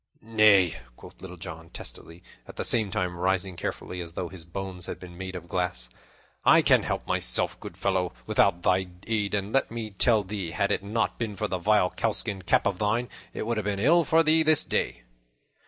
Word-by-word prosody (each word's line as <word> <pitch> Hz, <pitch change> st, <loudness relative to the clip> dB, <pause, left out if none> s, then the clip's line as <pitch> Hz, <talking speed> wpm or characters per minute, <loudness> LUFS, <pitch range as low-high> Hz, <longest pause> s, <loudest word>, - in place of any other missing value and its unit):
"Nay," 105 Hz, -6 st, +4 dB, 0.2 s
quoth -, -, -15 dB
Little 90 Hz, -1 st, -9 dB
John 85 Hz, -2 st, -9 dB
testily, 85 Hz, +2 st, -10 dB, 0.2 s
at -, -, -11 dB
the -, -, -3 dB
same 110 Hz, -4 st, +2 dB
time 90 Hz, -3 st, -2 dB
rising 95 Hz, 0 st, 0 dB
carefully, 90 Hz, +1 st, -5 dB
as 85 Hz, -1 st, -8 dB
though 85 Hz, 0 st, -4 dB
his 90 Hz, -3 st, -11 dB
bones 90 Hz, 0 st, -6 dB
had -, -, -6 dB
been 90 Hz, -1 st, -11 dB
made 95 Hz, +1 st, -6 dB
of 85 Hz, -1 st, -7 dB
glass, 85 Hz, -10 st, -2 dB, 0.5 s
"I -, -, +6 dB
can -, -, +5 dB
help -, -, -3 dB
myself, -, -, +2 dB
good -, -, -9 dB
fellow, 95 Hz, -2 st, 0 dB
without 85 Hz, +7 st, +2 dB
thy 95 Hz, 0 st, +2 dB, 0.2 s
aid; 105 Hz, -3 st, 0 dB
and 100 Hz, +1 st, -3 dB
let 135 Hz, -, +2 dB
me 115 Hz, -2 st, -5 dB
tell 110 Hz, +2 st, +4 dB
thee, 95 Hz, -2 st, -4 dB
had 100 Hz, -, 0 dB
it -, -, +1 dB
not 110 Hz, +3 st, -1 dB
been 110 Hz, -3 st, -3 dB
for -, -, -2 dB
that 95 Hz, -, -3 dB
vile 105 Hz, -1 st, +3 dB
cowskin 105 Hz, -3 st, -2 dB
cap 90 Hz, -, +2 dB
of 100 Hz, -3 st, 0 dB
thine, 110 Hz, +4 st, 0 dB, 0.2 s
it -, -, -5 dB
would 115 Hz, 0 st, -1 dB
have 110 Hz, -, -1 dB
been 100 Hz, -1 st, -1 dB
ill 160 Hz, -, +4 dB
for 165 Hz, +1 st, +3 dB
thee 160 Hz, +1 st, +4 dB
this 155 Hz, -1 st, +4 dB
day." -, -, -1 dB
95 Hz, 205 wpm, -27 LUFS, 90-110 Hz, 0.5 s, I